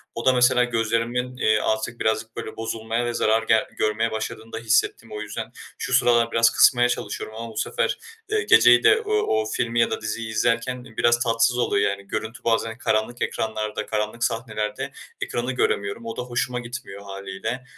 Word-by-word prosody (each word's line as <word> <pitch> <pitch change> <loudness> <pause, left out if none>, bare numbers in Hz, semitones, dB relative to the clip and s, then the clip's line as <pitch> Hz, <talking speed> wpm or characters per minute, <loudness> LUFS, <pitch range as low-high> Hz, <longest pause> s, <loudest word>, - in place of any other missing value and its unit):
O 115 - -5
da 130 - +6
mesela 125 0 +4
gözlerimin, 120 +2 -1
eee, 110 -2 +3
artık 110 +2 -1
birazcık 110 0 -1
böyle - - -6
bozulmaya 115 +1 -2
ve 120 - -2
zarar 110 0 +2
gel 110 0 +3
görmeye 110 +2 0
başladığını 110 +1 -5
da - - -3
hissettim 115 0 +1
o 105 0 -5
yüzden. 105 - -6 0.3
Şu - - -4
sıralar 120 -1 +4
biraz 115 0 +5
kısmaya 120 -1 +5
çalışıyorum 110 -2 -4
ama 115 0 -6
bu - - -11
sefer, 480 - 0 0.3
eee, 430 0 +1
geceyi - - +6
de 430 +1 +5
o 430 - -6
o 110 - +1
filmi 115 +2 -1
ya 115 - +3
da - - -3
diziyi 110 +1 -4
izlerken 120 +3 0
biraz 120 +1 +2
tatsız 115 +1 +2
oluyor, 100 -4 +2
yani, 100 0 -6
görüntü 110 +3 -5
bazen 115 0 0
karanlık 110 +1 -1
ekranlarda 110 -1 -2
karanlık 105 +2 -2
sahnelerde 110 -2 -2 0.3
ekranı 120 +2 -2
göremiyorum. 100 -3 -1
O 115 - -6
da - - -2
hoşuma 125 0 -2
gitmiyor 120 -5 -8
hâliyle. 100 +5 -5
115 Hz, 180 wpm, -24 LUFS, 110-120 Hz, 0.3 s, da